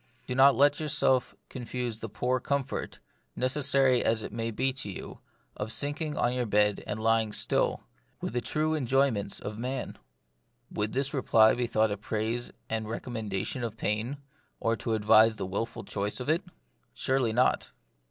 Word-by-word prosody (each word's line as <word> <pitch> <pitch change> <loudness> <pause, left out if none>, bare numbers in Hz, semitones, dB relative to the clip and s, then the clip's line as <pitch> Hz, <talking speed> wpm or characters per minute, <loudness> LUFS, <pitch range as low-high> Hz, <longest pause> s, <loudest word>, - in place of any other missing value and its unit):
Do 125 - -3
not 135 +2 +6
let 145 +1 +4
yourself 140 -4 +1
confuse 125 -2 -4
the 115 - -6
poor 125 +5 0
comfort, 140 0 -3 0.4
necessary 130 -1 +3
as 110 -1 +1
it - - -6
may 115 0 -2
be 130 +4 0
to 130 -5 -4
you, 95 - -8 0.4
of 105 +1 -4
sinking 145 +6 -2
on 120 - +1
your 125 -2 -1
bed 105 0 +2
and - - -3
lying 110 -1 +2
still, - - 0 0.4
with - - -4
the 120 - 0
true 155 +4 0
enjoy 135 -1 +2
ments 100 -2 -3
of 105 0 -6
a - - -9
man." 130 +2 -4 0.7
Would 105 +1 -2
this 135 +1 -1
reply 115 -5 +5
be 125 -1 -1
thought 110 -2 +2
a 100 - -2
praise 110 +3 -2 0.2
and 110 -1 -3
recommendation 110 0 -3
of 115 -2 -4
pain, 110 +7 -1 0.4
or 115 0 +1
to 110 +1 -2
advise 110 +1 +5
the - - -4
wilful 100 +5 -4
choice 100 +3 -3
of 125 - -4
it? 165 +3 +3 0.5
Surely 130 -3 +1
not. 125 +3 +2
120 Hz, 170 wpm, -29 LUFS, 110-135 Hz, 0.7 s, not